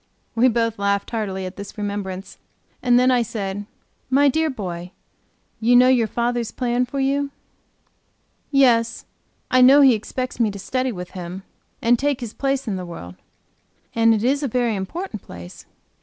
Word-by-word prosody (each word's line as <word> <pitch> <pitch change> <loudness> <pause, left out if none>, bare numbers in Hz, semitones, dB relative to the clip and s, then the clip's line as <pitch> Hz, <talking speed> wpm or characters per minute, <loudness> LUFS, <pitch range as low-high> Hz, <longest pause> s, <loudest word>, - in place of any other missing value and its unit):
We 240 +2 +4
both 230 -2 0
laughed 200 0 0
heartily 195 -5 -3
at 185 - -7
this 200 +1 -9
remembrance, 200 -2 -5 0.4
and 245 -1 +4
then 255 +1 +4
I 250 -1 +3
said: 205 -2 -4 0.4
"My 280 +2 +4
dear 315 +3 +1
boy, 180 - -6 0.7
you 235 +2 +4
know 250 +1 +7
your 240 -4 +3
fathers 235 +1 -1
plan 245 0 -1
for 275 +2 -4
you?" 280 +1 +1 1.2
"Yes, 235 -5 +3 0.5
I 255 - +5
know 270 +3 +8
he 270 -3 +7
expects 250 +4 -4
me 230 -2 +3
to 200 - -6
study 255 +6 -2
with 180 -4 -7
him, 180 +1 -7 0.4
and 240 0 +4
take 285 -1 0
his 235 -3 -6
place 275 -2 -1
in 200 -3 -1
the 185 - -5
world." 125 - -8 0.8
"And 230 0 +4
it 215 - -2
is 275 +4 +2
a 285 - 0
very 240 -2 0
important 215 - -5
place." 90 0 -11
230 Hz, 170 wpm, -22 LUFS, 200-255 Hz, 1.2 s, know